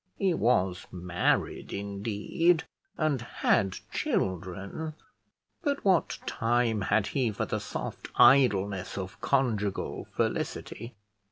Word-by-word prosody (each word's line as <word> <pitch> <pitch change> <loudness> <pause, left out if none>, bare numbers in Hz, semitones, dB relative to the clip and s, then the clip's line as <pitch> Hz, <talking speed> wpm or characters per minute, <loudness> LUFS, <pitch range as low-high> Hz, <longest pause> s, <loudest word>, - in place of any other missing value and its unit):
He 190 -3 +2
was 95 - +1
married, 90 -1 0
indeed, 105 - 0 0.3
and 155 -6 +1
had 100 -4 +1 0.2
children, 95 - -2 0.7
but 285 -6 -1
what 185 -4 +3
time 115 -2 +1
had 100 +2 +2
he 130 -1 0
for 100 - -2
the - - -2
soft - - -5
idleness 100 -9 +4
of 95 0 -6
conjugal 110 -8 0
felicity? 115 0 -2
110 Hz, 100 wpm, -29 LUFS, 95-135 Hz, 0.7 s, idleness